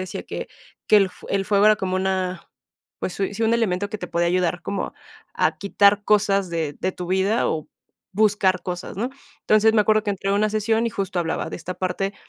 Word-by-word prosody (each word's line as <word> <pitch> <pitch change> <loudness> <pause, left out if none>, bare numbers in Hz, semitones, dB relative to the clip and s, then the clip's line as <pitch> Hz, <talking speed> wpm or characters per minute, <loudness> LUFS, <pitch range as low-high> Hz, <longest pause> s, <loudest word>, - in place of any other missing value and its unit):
decía 185 -1 -5
que - - -6 0.4
que 215 - +7
el 195 -2 +4
fue - - -13
el 195 - +1
fuego 205 +1 +3
era 215 0 +6
como 185 -1 -2
una, 185 -1 -2 0.5
pues 180 - -3
sui 200 +1 -2
sí, 225 - -3
un 225 +1 +3
elemento 205 -3 0
que 215 - -4
te 180 - -5
podía 170 0 0
ayudar 180 -1 0
como 200 - -3 0.4
a - - +1
quitar 200 +1 +3
cosas 200 -3 +2
de 160 -4 -2
de 185 - 0
tu 180 - -6
vida, 190 +5 +1
o 155 -1 -3 0.4
buscar 200 -3 +2
cosas, 180 0 -5
¿no? 240 +6 -2 0.3
Entonces, 215 +1 +4
me 210 - +5
acuerdo 215 0 +3
que 205 - 0
entré 195 0 -2
en - - +2
una 215 +1 +2
sesión, 220 +2 +1
y - - -1
justo 195 -2 -3
hablaba 165 -1 -2
de - - -5
esta 180 +2 -6
parte, 195 +2 -2
195 Hz, 220 wpm, -23 LUFS, 185-210 Hz, 0.5 s, que